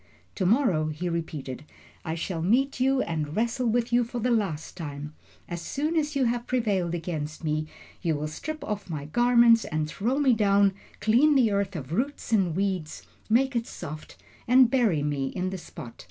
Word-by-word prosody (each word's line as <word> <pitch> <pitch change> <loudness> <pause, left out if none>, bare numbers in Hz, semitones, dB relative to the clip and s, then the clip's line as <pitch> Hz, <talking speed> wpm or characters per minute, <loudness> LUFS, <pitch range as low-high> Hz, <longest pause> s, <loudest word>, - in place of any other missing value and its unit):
To 185 - 0
morrow," 190 - +3
he 155 +3 -3
repeated, 150 -5 -4 0.4
"I 160 - -3
shall 165 0 -3
meet 250 +10 +2
you 265 +1 +3
and 155 -2 -3
wrestle 235 +3 0
with 235 +1 0
you 240 0 +5
for 240 +1 -6
the 245 +2 0
last 195 -9 -1
time. 150 -3 -6 0.3
As 175 -1 -5
soon 300 - -2
as 300 -2 0
you 270 -2 +2
have 240 0 -1
prevailed 200 -9 0
against 160 -2 -5
me, 155 0 -1 0.3
you 165 -4 0
will 150 +1 -3
strip 305 - -6
off 210 -3 -4
my 150 -3 -4
garments 235 +5 +5
and 155 0 -2
throw 230 - -1
me 275 -4 +4
down, 200 -2 +3 0.3
clean 265 +7 +4
the 240 -5 +4
earth 200 -1 -1
of 140 -3 -6
roots 265 +5 -2
and 190 -7 +2
weeds, 185 -5 -2 0.3
make 260 +4 +3
it 235 0 -1
soft, 155 -2 -8 0.3
and 250 0 +6
bury 220 - +2
me 145 -2 -1
in 185 +6 -3
the 190 - -5
spot. 145 -8 -10
200 Hz, 185 wpm, -27 LUFS, 160-240 Hz, 0.4 s, and